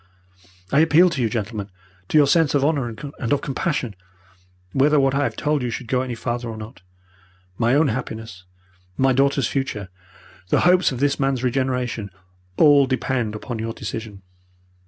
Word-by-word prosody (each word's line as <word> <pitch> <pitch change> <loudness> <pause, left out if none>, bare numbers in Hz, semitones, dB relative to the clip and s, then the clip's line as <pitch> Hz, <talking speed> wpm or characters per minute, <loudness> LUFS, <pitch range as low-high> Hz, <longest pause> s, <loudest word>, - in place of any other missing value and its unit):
I 140 - +4
appeal 165 +3 +5
to 140 -6 -2
you, 115 - +1
gentlemen, 105 -2 -4 0.4
to - - +3
your 150 - +7
sense 150 0 +3
of 140 -1 +2
honour 145 -5 +1
and 130 0 -6
of 145 -1 +2
compassion, 135 - -2 0.8
whether 145 +2 +4
what 135 -1 +2
I 140 - +1
have - - -3
told 150 -1 0
you 125 - -2
should 120 +2 -5
go 125 +1 +1
any 125 -2 -4
farther 120 0 -3
or 110 - -6
not. 110 +2 -10 0.8
My 120 +3 +3
own 150 0 +3
happiness, 110 -6 -6 0.5
my 135 0 +3
daughter's 140 +1 +2
future, 110 -8 -3 0.6
the - - +3
hopes 180 -1 +4
of 125 -1 -5
this 145 0 +1
man's 135 -2 0
regeneration, 125 -4 -1 0.5
all 145 -3 +6
depend 130 -4 -1
upon 115 +1 -6
your 115 0 -3
decision. 105 -2 -7
130 Hz, 170 wpm, -22 LUFS, 115-140 Hz, 0.8 s, your